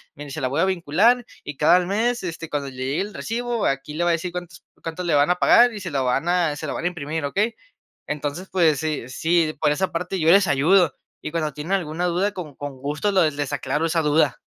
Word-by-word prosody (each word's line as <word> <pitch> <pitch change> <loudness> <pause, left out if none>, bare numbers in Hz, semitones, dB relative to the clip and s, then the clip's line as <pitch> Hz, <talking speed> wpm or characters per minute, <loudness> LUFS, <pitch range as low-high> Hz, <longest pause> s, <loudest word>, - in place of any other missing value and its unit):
mire, 145 -2 -9
se - - -5
la 130 - +1
voy 140 +5 0
a - - +4
vincular, 190 +7 +2 0.2
y 145 - -7
cada 155 +5 +5
al 180 0 +2
mes, 225 +5 0
este, 165 -2 -5
cuando 140 -2 -3
le 130 - -13
llegue 130 +5 -2
el 205 +2 -5
recibo, 240 0 -2
aquí 135 +2 -2
le 170 - -1
va 175 - +2
a - - +3
decir 170 +2 -2
cuántos 175 -1 -8 0.2
cuánto 165 +2 -5
le 170 -3 0
van 145 +1 +4
a 180 - +4
pagar, 240 +6 +5
y 210 - -6
se 185 -3 -6
lo 135 -2 0
van 135 +6 0
a 175 -4 +2
se - - -6
lo - - -3
van - - -4
a - - +4
imprimir, 160 -2 -4
¿okey?" 205 +11 0 0.5
Entonces, 150 +5 -4
pues, 165 -6 +3
sí, 155 -6 -3
sí, 160 +3 +1
por - - +3
esa 185 +6 -1
parte 180 +3 -3
yo 160 0 +3
les 195 0 +5
ayudo. 160 +2 +3 0.3
Y - - -4
cuando 155 -2 -1
tienen 150 +6 -4
alguna 175 -2 -1
duda, 180 +4 +1
con 160 -8 -7
con 145 -2 -7
gusto 150 +8 -1
lo 185 -5 +4
les 145 -2 -4
aclaro 145 +4 -1
esa 165 0 +1
duda. 150 0 +2
165 Hz, 250 wpm, -23 LUFS, 145-185 Hz, 0.5 s, cada